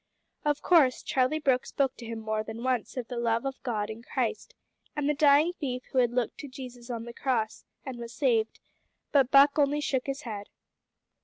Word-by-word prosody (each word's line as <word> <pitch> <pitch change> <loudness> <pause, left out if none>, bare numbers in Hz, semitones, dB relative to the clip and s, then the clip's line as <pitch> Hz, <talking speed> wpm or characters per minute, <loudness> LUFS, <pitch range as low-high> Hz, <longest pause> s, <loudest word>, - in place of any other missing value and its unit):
Of 295 0 0
course 300 -8 +4
Charlie 260 +4 +1
Brooke 265 -5 +1
spoke 270 -2 0
to 235 - -9
him 230 0 -4
more 215 0 -1
than 220 +2 -7
once 255 0 -1
of 245 -2 -3
the 245 -2 -4
love 230 +1 +1
of 270 -1 -4
God 220 -4 -2
in 220 +1 -8
Christ, - - -3 0.4
and 295 -2 -1
of 295 - +2
the - - -26
dying 300 +3 +5
thief 255 -5 -3
who 265 - +2
had 245 -2 +4
looked 240 -1 -2
to 285 - -6
Jesus 250 -2 -10
on 230 -2 -3
the 235 - -8
cross 235 -4 -1 0.2
and 260 -3 -6
was 235 -1 -7
saved, 230 -3 +1 0.5
but 270 -4 +4
Buck 280 +2 +6
only 290 +1 +3
shook 270 -3 -1
his 275 +1 -3
head. 205 -4 -6
255 Hz, 210 wpm, -28 LUFS, 235-280 Hz, 0.5 s, Buck